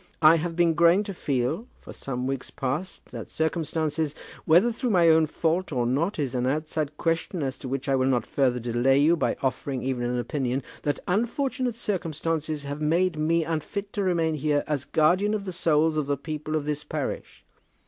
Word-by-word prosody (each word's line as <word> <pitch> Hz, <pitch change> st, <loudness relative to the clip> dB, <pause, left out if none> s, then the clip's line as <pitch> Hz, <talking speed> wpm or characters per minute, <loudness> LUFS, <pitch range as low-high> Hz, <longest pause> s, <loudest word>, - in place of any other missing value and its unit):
I 155 Hz, +2 st, +8 dB
have 165 Hz, +1 st, -3 dB
been 170 Hz, -1 st, +3 dB
growing 170 Hz, +5 st, +5 dB
to 200 Hz, -1 st, -6 dB
feel, 145 Hz, -, -1 dB
for -, -, -11 dB
some 125 Hz, -2 st, -4 dB
weeks 135 Hz, -1 st, -3 dB
past, 145 Hz, +6 st, -4 dB
that -, -, -7 dB
circumstances, 160 Hz, -1 st, -1 dB, 0.3 s
whether 180 Hz, +9 st, +5 dB
through 245 Hz, +2 st, -2 dB
my 175 Hz, -5 st, +5 dB
own 160 Hz, -1 st, +5 dB
fault 165 Hz, +4 st, -1 dB
or 125 Hz, -4 st, 0 dB
not 150 Hz, -, 0 dB
is 140 Hz, -5 st, -2 dB
an 125 Hz, 0 st, 0 dB
outside 150 Hz, +1 st, -2 dB
question 165 Hz, 0 st, -1 dB
as 130 Hz, -1 st, -3 dB
to -, -, -7 dB
which 135 Hz, +2 st, -3 dB
I 135 Hz, -, +3 dB
will 130 Hz, 0 st, +2 dB
not 125 Hz, -4 st, +1 dB
further 125 Hz, -3 st, +1 dB
delay 120 Hz, +3 st, +2 dB
you 155 Hz, +4 st, +5 dB
by 165 Hz, -, 0 dB
offering 130 Hz, 0 st, -2 dB
even 130 Hz, -2 st, -1 dB
an 125 Hz, +1 st, -1 dB
opinion, 130 Hz, +1 st, -2 dB, 0.2 s
that 145 Hz, -2 st, -1 dB
unfortunate 245 Hz, +5 st, 0 dB
circumstances 160 Hz, -, -2 dB
have 145 Hz, +1 st, -5 dB
made 170 Hz, +3 st, +2 dB
me 165 Hz, +2 st, +2 dB
unfit 165 Hz, +6 st, -4 dB
to 205 Hz, -, -1 dB
remain 170 Hz, -4 st, +1 dB
here 150 Hz, -1 st, +1 dB
as 145 Hz, -3 st, -2 dB
guardian 185 Hz, +7 st, +2 dB
of 200 Hz, -2 st, -4 dB
the 185 Hz, -, -3 dB
souls 160 Hz, -2 st, +2 dB
of 150 Hz, -2 st, 0 dB
the 145 Hz, 0 st, 0 dB
people 155 Hz, +1 st, -4 dB
of 150 Hz, -2 st, -1 dB
this 150 Hz, 0 st, -2 dB
parish. -, -, -5 dB
155 Hz, 195 wpm, -26 LUFS, 135-170 Hz, 0.3 s, I